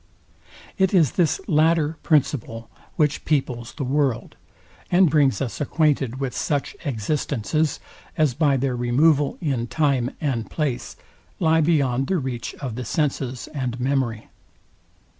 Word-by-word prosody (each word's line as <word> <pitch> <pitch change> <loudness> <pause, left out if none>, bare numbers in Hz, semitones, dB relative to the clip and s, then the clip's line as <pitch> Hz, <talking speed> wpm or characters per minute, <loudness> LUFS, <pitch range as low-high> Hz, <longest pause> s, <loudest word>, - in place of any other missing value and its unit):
It 190 0 +3
is 160 -8 +4
this 170 -2 +1
latter 160 -2 +2
principle, 130 -7 0 0.2
which 150 -1 +1
peoples 125 -6 -1
the 150 - -4
world, 135 -2 0 0.5
and 180 -3 +4
brings 140 -3 +3
us 130 +3 -5
acquainted 145 -4 +1
with 135 -3 -3
such 145 -3 -1
existences, 145 +3 -1 0.4
as 155 -5 +3
by 145 -1 +2
their 130 -1 -1
removal 140 +5 +2
in 135 -7 -1
time 135 -4 +1
and 130 -7 -2
place, 145 -6 -3 0.4
lie 160 -2 +3
beyond 135 -5 +1
the 190 - +1
reach 130 -5 -4
of 130 -5 -5
the 125 +3 -5
senses 130 -1 -2
and 125 -4 -3
memory. 125 -4 -1
140 Hz, 130 wpm, -23 LUFS, 125-155 Hz, 0.5 s, is